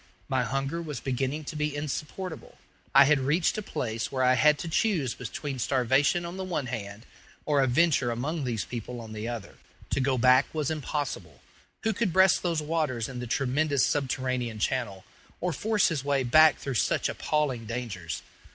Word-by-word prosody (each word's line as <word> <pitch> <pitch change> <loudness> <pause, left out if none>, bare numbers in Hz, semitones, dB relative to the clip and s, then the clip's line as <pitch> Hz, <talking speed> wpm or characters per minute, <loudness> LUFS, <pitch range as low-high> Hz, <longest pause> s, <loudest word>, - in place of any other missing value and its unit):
My 130 -1 +1
hunger 135 +7 -2
was 150 -6 -5
beginning 135 +3 -2
to 155 - -7
be 150 -1 -1
insupportable. 150 +4 -5 0.4
I 140 - +10
had 150 0 +4
reached 150 +6 +1
a - - -3
place 115 - -3
where 130 -1 0
I 130 0 +5
had 150 +3 +4
to 170 - -5
choose 165 - +1
between 130 +3 -5
starvation 135 +7 +2
on 170 +2 -6
the 190 - -3
one 175 -7 -2
hand, 110 -2 -6 0.4
or 145 -2 +3
a 135 - +3
venture 140 -1 +3
among 140 +7 -2
these 120 -4 -2
people 120 +1 -6
on 110 -1 -9
the 110 +1 -5
other. 120 -4 -6 0.3
To - - +1
go 135 -1 +1
back 130 +2 +5
was 155 -1 0
impossible. 135 - -4 0.4
Who 220 - +1
could 205 -2 0
breast 190 +1 +5
those 165 -3 -1
waters 150 -8 -1
in 125 -2 -7
the 125 - -5
tremendous 140 +3 +1
subterranean 130 -4 -1
channel, 105 -4 -2 0.3
or 180 -1 -1
force 210 +6 +2
his 155 -6 -2
way 140 -1 +1
back 155 +5 +6
through 135 - -4
such - - +1
appalling 135 -7 -1
dangers? 105 -9 -5
135 Hz, 180 wpm, -28 LUFS, 125-155 Hz, 0.4 s, I